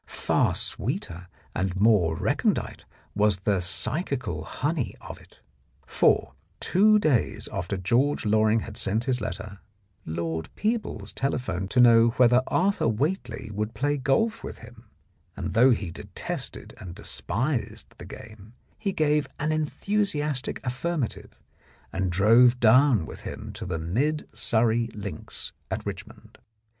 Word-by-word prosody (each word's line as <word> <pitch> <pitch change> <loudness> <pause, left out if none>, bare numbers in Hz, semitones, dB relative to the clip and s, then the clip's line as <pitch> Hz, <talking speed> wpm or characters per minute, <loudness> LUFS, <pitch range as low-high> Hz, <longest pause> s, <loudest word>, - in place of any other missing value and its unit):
Far - - +1
sweeter 90 +2 -3 0.3
and 95 -1 -1
more 100 -7 +4
recondite - - -1 0.3
was 105 -2 +2
the 100 -1 +1
psychical 105 - 0
honey 145 - -2
of - - -10
it. - - -22 0.4
For, - - +2 0.3
two 215 +3 +4
days 155 - +1
after 90 +3 -3
George 120 +11 +1
Loring 110 +1 +3
had 110 -1 -7
sent 110 +4 0
his 125 -2 -1
letter, 105 -2 -6 0.5
Lord 80 0 -3
Peebles 210 - -2
telephoned 125 -9 -2
to 125 - +1
know 115 -1 +7
whether 125 0 +5
Arthur 195 -4 +1
Whately 125 - -2
would 105 +2 -3
play 145 +2 0
golf 145 - 0
with - - -7
him, 115 0 -14 0.5
and - - -4
though 125 +4 +6
he 105 -8 0
detested - - -6
and 85 -2 -9
despised 125 - -3
the - - -9
game, 110 0 -12 0.3
he 200 -3 -2
gave 150 -2 +1
an 150 +2 0
enthusiastic 155 -3 -1
affirmative, 130 +1 -3 0.6
and 95 -1 -1
drove 115 +7 +5
down 120 - +5
with - - -9
him - - -7
to - - -7
the 85 -3 -2
Mid 130 - -1
Surrey 115 0 +2
links 100 -1 -5 0.2
at - - -4
Richmond. - - -9
115 Hz, 130 wpm, -26 LUFS, 100-145 Hz, 0.6 s, know